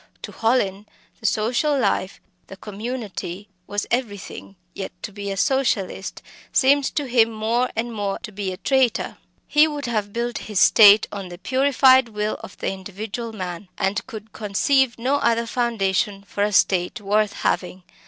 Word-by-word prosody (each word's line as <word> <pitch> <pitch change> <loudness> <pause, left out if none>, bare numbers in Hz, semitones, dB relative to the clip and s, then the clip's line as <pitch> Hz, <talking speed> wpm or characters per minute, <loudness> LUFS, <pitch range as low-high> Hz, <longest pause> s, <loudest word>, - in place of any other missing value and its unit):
To - - -6
Hallin 210 -4 0 0.3
the 220 - -1
social 245 +9 +1
life, 195 -7 0 0.3
the 195 - -11
community, 210 -3 -6 0.2
was 205 0 -2
everything 205 -5 -4 0.2
yet 195 - -5
to - - -5
be 200 0 -6
a 195 - -3
"Socialist" 200 -5 -1 0.3
seemed 280 +1 +4
to 290 - 0
him 235 -3 +3
more 230 +3 0
and 230 +1 -2
more 205 -2 -2
to 215 - -7
be 195 -2 -4
a 185 - -6
traitor! 265 -2 +1 0.3
He 300 +1 +5
would 295 -2 -5
have 215 -4 -2
built 235 +1 -2
his 210 -3 0
state 210 -1 +7
on 195 -3 -6
the 175 - -9
purified 260 +2 +4
will 210 0 -3
of - - -10
the - - -2
individual 205 +4 -6
man, 185 -3 -6
and 195 +3 -1
could 220 -3 -10
conceive 240 +5 +1
no 260 +5 +1
other 235 -4 +1
foundation 205 -5 -1
for 200 - -5
a 210 - +1
state 185 +2 +2
worth 210 0 +1
having. 180 0 -2
215 Hz, 165 wpm, -22 LUFS, 200-245 Hz, 0.3 s, state